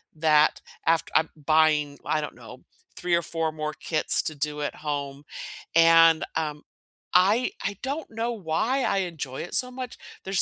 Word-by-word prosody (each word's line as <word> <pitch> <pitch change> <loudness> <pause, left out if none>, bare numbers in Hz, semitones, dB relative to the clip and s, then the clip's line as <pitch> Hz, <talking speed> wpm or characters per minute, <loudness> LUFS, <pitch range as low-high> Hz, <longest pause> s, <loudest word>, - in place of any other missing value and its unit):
that 155 -1 +3 0.2
aft 165 0 +2
uh, 160 - +6
buying, 150 -1 +2
I 155 - +1
don't 150 - -6
know, - - -13 0.3
3 175 -1 +1
or 170 - +2
4 165 -1 -2
more 155 0 -4
kits 155 +2 0
to 155 - -3
do 150 +1 -3
at 145 - -3
home, 145 -2 -4 0.5
and, 165 -1 +6
um, 150 -2 -2 0.5
I 205 +7 +4
I 200 - -2
don't 280 +3 -4
know 230 +2 -2
why 220 +7 0
I 200 - +1
enjoy 155 -8 -4
it 175 - -6
so 250 -1 +1
much, 255 -1 -7 0.3
there's 195 0 +1
160 Hz, 165 wpm, -26 LUFS, 150-190 Hz, 0.5 s, uh